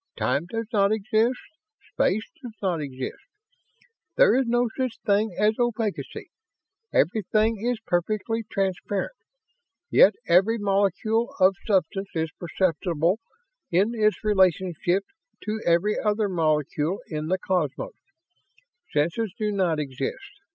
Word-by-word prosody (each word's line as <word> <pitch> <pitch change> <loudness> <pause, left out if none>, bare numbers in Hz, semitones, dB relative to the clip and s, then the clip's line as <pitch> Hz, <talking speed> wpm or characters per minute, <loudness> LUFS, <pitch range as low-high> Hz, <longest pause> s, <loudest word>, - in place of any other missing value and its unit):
Time 150 +5 0
does 225 +4 -3
not 200 -1 +3
exist. 220 +3 +1 0.6
Space 215 +3 +1 0.2
does 240 -4 -9
not 180 -5 -1
exist. 130 -3 -6 1.0
There - - +6
is 260 -1 +2
no 240 +1 +2
such 255 -3 -2
thing 205 -2 +2
as 210 +1 +3
opacity; 230 -4 -2 0.6
everything 215 +3 +1
is 245 -1 0
perfectly 215 +5 -1
transparent, 195 - -1 0.8
yet 205 - +6
every 190 +7 +4
molecule 205 +3 0
of 185 +1 +6
substance 195 -1 0
is 160 0 -1
perceptible 175 +1 0 0.5
in 195 +7 +2
its 215 -2 +1
relationship 190 -2 +2 0.4
to 215 0 -3
every 175 +5 +2
other 210 0 +1
molecule 155 0 0
in 155 -1 -3
the 185 +3 +1
cosmos. 180 - -2 1.0
Senses 170 +9 0
do 215 -3 -1
not 180 -6 +1
exist. 140 - -5
200 Hz, 115 wpm, -25 LUFS, 175-220 Hz, 1.0 s, There